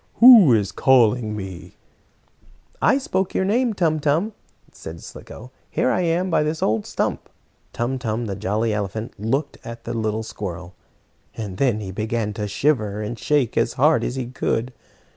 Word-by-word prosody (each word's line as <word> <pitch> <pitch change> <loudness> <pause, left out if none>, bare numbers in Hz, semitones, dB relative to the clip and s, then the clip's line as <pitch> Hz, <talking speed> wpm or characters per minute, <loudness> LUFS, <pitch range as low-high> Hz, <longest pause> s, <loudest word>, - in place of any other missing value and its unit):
"Who 230 - +9
is 105 -4 +2
calling 120 -4 +3
me?" 95 -3 -8 1.1
"I 275 - +4
spoke 190 -8 -2
your 190 - +1
name, 230 +2 +1
Tum 160 -4 +1
Tum," 160 +9 0 0.4
said 80 +1 -10
Slicko. 125 +3 -11 0.2
"Here 130 - +1
I 180 - +1
am, 175 +2 0
by 165 - +3
this 155 +1 -2
old 110 0 0
stump." - - -2 0.4
Tum 125 +3 -2
Tum, 115 -1 -2
the 100 -3 -4
jolly 110 +3 -1
elephant, 105 +2 -4
looked 135 +8 -2
at 115 0 -9
the - - -5
little 110 -1 -2
squirrel, 90 -4 -7 0.6
and 100 -4 -5
then 120 -6 +1
he 95 -2 -6
began 110 +1 -2
to 105 0 -4
shiver 105 -2 0
and 110 +2 -5
shake 145 -6 +1
as - - +1
hard - - +3
as 125 - -3
he 130 -2 -3
could. 125 0 -2
115 Hz, 165 wpm, -22 LUFS, 105-150 Hz, 1.1 s, Who